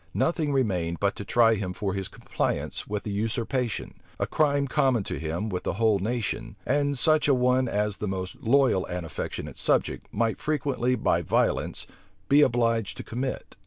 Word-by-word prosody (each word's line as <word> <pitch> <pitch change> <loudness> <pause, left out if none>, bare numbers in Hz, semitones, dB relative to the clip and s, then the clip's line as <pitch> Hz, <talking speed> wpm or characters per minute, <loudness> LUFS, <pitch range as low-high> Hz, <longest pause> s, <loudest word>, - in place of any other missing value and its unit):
Nothing 160 -3 +1
remained 90 -11 0
but 100 0 +1
to - - -5
try 115 +2 +4
him 95 -4 -3
for 95 +1 -2
his 95 -1 -3
compliance - - -3
with 105 -1 -3
the 105 - -4
usurpation; 115 +3 -2 0.3
a - - +1
crime 140 -2 +1
common 130 -5 +2
to - - -4
him 80 +6 -3
with 90 -4 -3
the - - -2
whole 110 -1 +2
nation, 115 +2 -3
and 145 0 +1
such 155 +4 +3
a 140 - +5
one 125 +1 +2
as 105 -2 -1
the 105 - -3
most 95 -1 -4
loyal 125 -6 +3
and 90 -1 -4
affectionate 80 - -5
subject - - +1
might 115 +1 0
frequently 130 -4 0
by 115 - +1
violence - - 0 0.4
be 145 +2 +6
obliged 115 -6 +2
to - - -6
commit. 130 +3 -4
115 Hz, 175 wpm, -26 LUFS, 100-130 Hz, 0.4 s, be